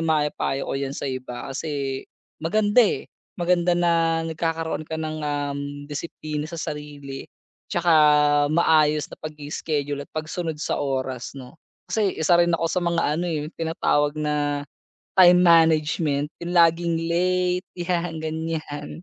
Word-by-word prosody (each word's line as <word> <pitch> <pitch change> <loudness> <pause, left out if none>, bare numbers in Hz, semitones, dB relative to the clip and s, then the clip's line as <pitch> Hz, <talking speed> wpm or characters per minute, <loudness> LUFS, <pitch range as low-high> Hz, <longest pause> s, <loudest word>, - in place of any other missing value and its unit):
maipayo 150 -3 0
ko - - -2
yan 140 0 -3
sa - - -5
iba. 130 0 -6
Kasi, 140 -2 -3 0.4
maganda, 205 +7 +1
eh, 220 - +2 0.3
maganda 175 0 +2
na 165 -1 +2
nagkakaroon 160 -1 -2
ka 160 - -5
ng, 155 0 -3
um, 145 -1 -2 0.3
disiplina 150 0 -4
sa 165 - -9
sarili. 150 -4 -6 0.4
Tsaka, 175 0 0 0.6
maayos 155 -2 +3
na - - -10
pag-i-schedule 145 -1 -4
at - - -59
pagsunod 160 +1 -3
sa - - -1
oras, 130 -3 -3
no? 130 +3 -11 0.3
Kasi, 210 -3 +1
isa 165 +2 +3
rin 175 0 +4
ako 165 - -1
sa 180 - 0
mga 170 -1 +1 0.2
ano, 175 - -1
eh 165 - -1
'yong 155 - -8
tinatawag 150 -3 +1
na 145 -1 0 0.5
time 180 -1 +8
management, 155 -3 +3
yung 175 +1 -4
laging 170 0 +4
late, 180 +1 +1
yan, 175 -1 -1
ganyan. 160 -2 -4
160 Hz, 140 wpm, -24 LUFS, 145-170 Hz, 0.6 s, time